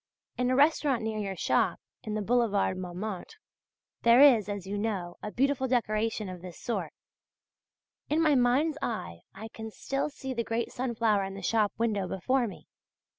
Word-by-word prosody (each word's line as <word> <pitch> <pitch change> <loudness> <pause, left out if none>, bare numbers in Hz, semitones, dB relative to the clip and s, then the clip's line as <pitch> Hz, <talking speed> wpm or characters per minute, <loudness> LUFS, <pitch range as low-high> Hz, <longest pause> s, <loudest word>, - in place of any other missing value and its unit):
In 250 0 0
a 255 - +2
restaurant 280 -3 +3
near 220 -1 -2
your 195 -2 -3
shop - - +1 0.2
(in 215 -2 -4
the 215 - -1
Boulevard 215 -4 +2
Montmartre), 185 - -6 0.6
there 235 +1 +6
is, 245 -8 +7
as 200 -2 -4
you 195 +2 -4
know, 200 -5 -3
a 210 - -5
beautiful 265 +1 +1
decoration 220 -3 0
of 180 -2 -7
this 180 -2 -9
sort. 235 - -3 1.2
In 305 - +2
my 310 -2 +4
mind's 275 +5 +2
eye 85 - -4 0.2
I 220 - -8
can 220 0 -8
still 275 +6 -2
see 265 -2 -6
the 235 -2 -1
great 230 +1 -2
sunflower 230 -5 +1
in 195 0 -6
the 195 - -8
shop 215 0 +2
window 210 -5 0
before 245 +8 0
me. 200 - -10
225 Hz, 175 wpm, -29 LUFS, 200-255 Hz, 1.2 s, is